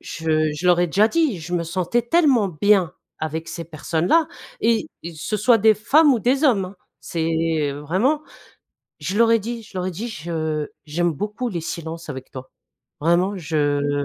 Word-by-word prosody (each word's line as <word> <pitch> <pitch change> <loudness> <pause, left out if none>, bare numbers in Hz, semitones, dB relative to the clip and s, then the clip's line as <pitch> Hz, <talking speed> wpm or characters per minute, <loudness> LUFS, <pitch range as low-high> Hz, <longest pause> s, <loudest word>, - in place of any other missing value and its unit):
je 155 -1 -1
je 175 +4 -3
leur 175 -1 +5
ai 175 - +3
déjà 200 +6 +3
dit, 300 - +1
je 165 +3 -8
me 170 -1 0
sentais 185 +7 0
tellement 255 - +3
bien 200 -5 +4 0.2
avec 160 +1 -4
ces 170 - -6
personnes 160 +1 -2
là 330 -1 +4 0.3
et 225 -1 +2 0.3
ce 165 +7 -3
soit 225 +3 +4
des 220 +1 +5
femmes 280 +8 +4
ou - - 0
des 260 +6 +1
hommes, 225 -9 +3
hein. 190 +2 -12 0.2
C'est, 165 -1 -2 0.4
heu, 145 - -7
vraiment, 210 - +1 0.8
je 195 - -3
leur 230 0 +5
ai 230 - +5
dit, 230 +2 -5
je 200 - -10
leur 180 - -2
ai - - -2
dit: 205 +7 -5
«Je 155 -5 -3 0.2
j'aime 170 +2 0
beaucoup 210 - -3
les 170 -5 -4
silences 165 0 -6
avec 130 -2 -7
toi.» 130 0 -9 0.5
Vraiment, 175 +5 +2
je 145 -3 0
180 Hz, 190 wpm, -22 LUFS, 160-225 Hz, 0.8 s, leur